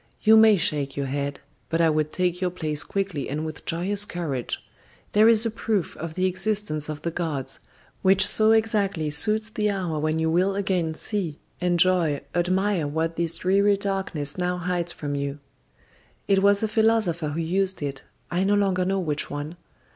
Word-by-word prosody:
You 220 0 +7
may 220 -2 +7
shake 145 -5 -1
your 140 - -1
head, 140 +1 -3 0.3
but 165 - 0
I 165 -1 +4
would 155 0 0
take 180 0 -1
your 180 - +1
place 155 -4 -2
quickly 195 -7 -3
and 150 +3 -3
with 155 -1 -8
joyous 195 +5 +1
courage. 155 - -3 0.5
There 215 +2 +5
is 230 0 +6
a 230 - 0
proof 210 -5 -2
of 160 0 -7
the 185 - 0
existence 185 -5 -1
of 155 0 -6
the 170 - -2
gods, 155 -6 -4 0.4
which 190 +1 +4
so 215 +1 +4
exactly 205 -8 +1
suits 215 +9 +3
the 210 -2 0
hour 180 -6 -2
when 155 +1 0
you 160 0 0
will 185 +4 +2
again 185 -5 -1
see, 175 -5 -3 0.2
enjoy, 175 -4 +2
admire 185 -1 0
what 160 +3 -2
this 170 -1 0
dreary 200 +2 +2
darkness 190 -7 -3
now 180 0 -1
hides 175 -1 -1
from 145 -3 -5
you. 140 0 -3 0.9
It 195 -1 +3
was 200 +1 +4
a - - +2
philosopher 215 -7 +1
who 150 +3 -4
used 185 +1 0
it; 135 -1 -4 0.3
I 175 +2 +1
no 200 +1 +2
longer 190 -3 +1
know 195 +1 0
which 155 -5 -2
one. 145 +3 -5
180 Hz, 180 wpm, -24 LUFS, 155-200 Hz, 0.9 s, You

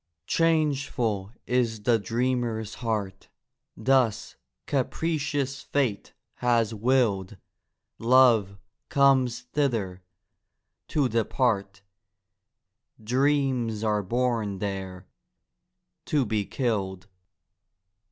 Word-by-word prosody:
Changeful 140 - 0
is 115 -4 0
the 115 0 +3
dreamer's 115 0 -1
heart, 105 -5 -3 0.5
Thus 130 -5 +1 0.3
capricious 145 -1 -1
fate 130 -8 -1 0.2
has 115 -2 +1
willed: 110 -4 +1 0.6
Love 115 -5 +4 0.3
comes 135 -3 +3
thither—to 115 +3 -4
depart, 110 -3 0 1.2
Dreams 130 -3 +1
are 105 -1 +1
born 115 -1 -1
there—to 95 - -6
be 105 -2 -1
killed. 100 -7 -2
115 Hz, 65 wpm, -26 LUFS, 100-130 Hz, 1.2 s, Love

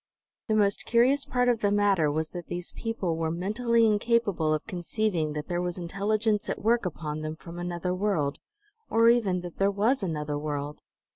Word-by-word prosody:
The 215 - +1
most 205 -2 +2
curious 255 +4 +3
part 245 0 +1
of 240 -2 +3
the 205 - +2
matter 200 -6 +3
was 155 +2 -2
that 175 -2 -7
these 175 0 -2
people 195 -8 -3
were 165 -1 -1
mentally 225 +7 +1
incapable 210 -6 +2
of 155 0 -1
conceiving 180 -4 -1
that 150 0 -5
there 175 -1 -1
was 180 0 -3
intelligence 205 +4 -1
at - - -4
work 230 -2 +2
upon 155 -2 -5
them 155 0 -4
from 170 +1 -10
another 175 +1 -2
world, 180 -7 0 0.5
or 230 +1 +5
even 205 -7 +2
that 175 -1 -9
there 195 0 +4
was 220 +7 +1
another 150 -5 -2
world. 145 -1 -4
185 Hz, 185 wpm, -27 LUFS, 160-220 Hz, 0.5 s, or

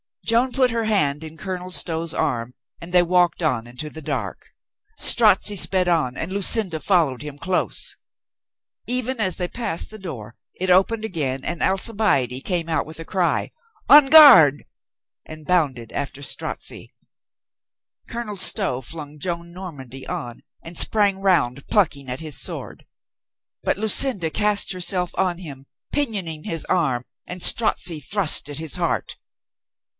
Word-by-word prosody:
Joan 235 +3 +1
put 255 -2 +2
her 230 -1 -2
hand 155 -9 0
in 160 0 -11
Colonel 185 0 -6
Stow's 165 -2 0
arm 120 0 -2 0.3
and 170 +1 -11
they 180 -1 +5
walked 175 -1 +1
on 125 -7 -1
into 125 +6 -7
the 160 - -10
dark. - - -5 0.5
Strozzi 210 -2 +5
sped 185 0 +2
on 155 -8 0
and 165 - -5
Lucinda 195 -3 +2
followed 160 -9 +1
him 150 -1 -8
close. 180 +4 -1 0.9
Even 250 0 -2
as 190 -5 -1
they 180 -1 -4
passed 225 -8 -4
the 215 - -11
door 120 - -9 0.2
it 185 +1 -4
opened 205 +5 +2
again 135 -9 -3
and 170 - -4
Alcibiade 190 - 0
came 170 -3 -2
out 160 -3 -1
with 160 0 -9
a 165 - -8
cry: 185 -1 -1 0.4
"On 290 -1 +8
guard!" 255 - +8 0.6
and 155 -1 -11
bounded 140 -10 -1
after 140 0 -5
Strozzi. - - -4 1.2
Colonel 230 -3 -6
Stow 190 - +3
flung 150 +2 -7
Joan 170 0 -5
Normandy 140 -8 -9
on 120 -1 -6 0.2
and 165 +1 -8
sprang 200 -3 +4
round, 140 -9 0
plucking 145 - 0
at 125 +4 -3
his 155 -4 -2
sword. - - -3 0.8
But - - 0
Lucinda 215 -4 +1
cast 210 0 +1
herself 180 -1 0
on 180 -2 -1
him, 140 -6 -10 0.3
pinioning 195 - -3
his 165 -2 -3
arm 135 -9 -1 0.2
and 180 0 -4
Strozzi 175 -7 +3
thrust 165 -1 +3
at 145 - -4
his 160 -2 -2
heart. - - -3
175 Hz, 145 wpm, -21 LUFS, 150-200 Hz, 1.2 s, On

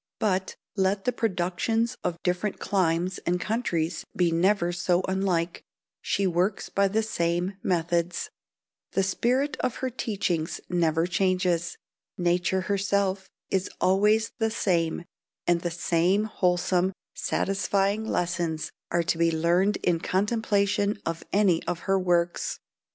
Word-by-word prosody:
But, 190 -3 0 0.2
let 195 0 +1
the 250 - +3
productions 225 +2 0
of 175 -2 -1
different 180 +3 -1
climes 180 -1 0
and 180 +1 -1
countries 175 -7 -1
be 175 -2 +2
never 175 +1 +2
so 180 +1 +1
unlike, 185 -3 0 0.4
she 200 - 0
works 185 +3 0
by 200 0 +2
the 215 +3 +1
same 175 -1 -1
methods; 170 0 0 0.6
the 195 - +2
spirit 255 +9 +1
of 250 - -1
her 260 -1 -3
teachings 190 -8 -2
never 165 -2 +2
changes; 180 -1 0 0.4
nature 175 +1 +1
herself 195 0 0 0.2
is 190 -1 0
always 210 +4 +3
the 225 -1 +2
same, 170 -6 0 0.4
and 175 -1 +2
the 175 - -1
same 175 +4 +1
wholesome, 180 -2 +1 0.2
satisfying 195 +1 0
lessons 175 -5 -1 0.2
are 170 0 +1
to 165 0 -1
be 170 0 +4
learned 175 +5 +2
in 175 -2 +2
the - - -18
contemplation 205 0 +1
of 165 0 -3
any 195 -5 +3
of 170 - -2
her 195 0 +1
works. 175 -1 0
185 Hz, 130 wpm, -27 LUFS, 175-200 Hz, 0.6 s, be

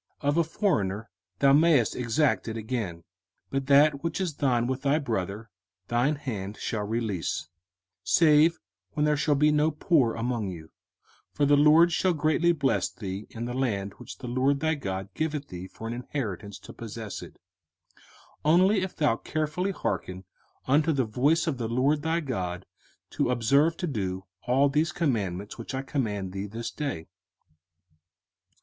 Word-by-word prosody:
05:015:003 140 - +2
Of 145 - +1
a 170 - +5
foreigner 115 - -1 0.3
thou 135 +4 +5
mayest 150 -6 +4
exact 125 +1 +1
it 110 0 -4
again: 110 -7 -4 0.5
but 135 -1 -2
that 140 +1 +5
which 165 +1 -2
is 175 -6 -2
thine 125 -4 +2
with 130 +1 -2
thy 145 +1 +2
brother 110 - -3 0.4
thine 125 +6 +2
hand 110 -8 -5
shall 105 -2 -3
release; 100 -8 -2 0.5
05:015:004 - - -20
Save 160 +1 +5 0.3
when 150 - +1
there 150 0 +3
shall 150 0 +2
be 150 +2 +4
no 150 +1 +3
poor 150 -6 +2
among 115 -2 -2
you; 80 -3 -9 0.6
for 145 - +1
the 145 +1 +5
LORD 155 +4 +6
shall 180 +2 +2
greatly 155 +2 +2
bless 140 -5 +1
thee 100 -1 -6
in 115 +1 -6
the 120 - -4
land 105 -7 -1
which - - -10
the 125 - -8
LORD 130 +3 +1
thy 160 +1 +1
God 95 - -4
giveth 155 -2 -3
thee 90 +1 -7
for 110 - -10
an 115 - -3
inheritance 110 - -5
to - - -12
possess 110 -2 -7
it: - - -10 0.6
05:015:005 - - -27 0.5
Only 185 +6 +4
if 190 0 -4
thou 150 - +2
carefully 155 +5 -2
hearken 95 - -3 0.4
unto 150 +4 +3
the 135 -4 +1
voice 140 +9 +2
of 150 -7 -2
the 115 -2 -2
LORD 135 +5 +2
thy 165 +2 0
God, 95 - -4 0.5
to - - 0
observe 140 +7 +3
to 180 - -2
do 95 - -3 0.2
all 135 +3 +4
these 150 +3 +1
commandments 105 - -2
which 115 - -5
I 135 - -3
command 105 -9 -2
thee 95 +2 -4
this 115 +3 -5
day. 135 - -4
130 Hz, 170 wpm, -27 LUFS, 110-150 Hz, 0.6 s, LORD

